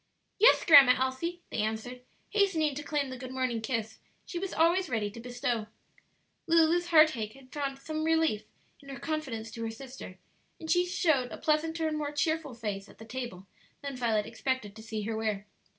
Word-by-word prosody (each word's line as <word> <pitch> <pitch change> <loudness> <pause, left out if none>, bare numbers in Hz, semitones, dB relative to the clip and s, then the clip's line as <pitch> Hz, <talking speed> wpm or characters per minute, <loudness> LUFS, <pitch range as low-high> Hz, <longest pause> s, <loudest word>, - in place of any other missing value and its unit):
"Yes, 450 +5 +6
Grandma 275 -6 +9
Elsie," 260 +7 -2
they - - -3
answered, 220 +4 -3 0.3
hastening 360 -8 +2
to 285 - -5
claim 285 -2 -2
the 260 - -6
good 255 0 -7
morning 255 -3 -1
kiss 220 -1 -3 0.3
she 345 - -4
was 385 +1 -3
always 345 +3 +3
ready 215 -4 -1
to 230 - -10
bestow. 245 -2 -2 0.8
Lulu's 335 +1 +4
heartache 310 -10 +4
had 265 -1 -17
found 275 -2 -2
some 310 +3 -4
relief 320 -9 +2 0.3
in 280 - -15
her 270 -2 -7
confidence 260 -9 -4
to 230 - -6
her 225 - -2
sister, 235 -5 -9 0.4
and 320 - -4
she 355 0 +3
showed 315 -9 +2
a - - -6
pleasanter 320 +1 +1
and 305 -1 -2
more 290 -1 -2
cheerful 310 -3 -1
face 205 -3 -4
at - - -16
the 220 - -11
table 230 -6 -6 0.4
than 280 -1 -4
Violet 225 -4 +1
expected 230 -3 -3
to 220 - -10
see 220 -1 -4
her 220 +1 -2
wear. 215 -2 -2
260 Hz, 185 wpm, -30 LUFS, 225-315 Hz, 0.8 s, Grandma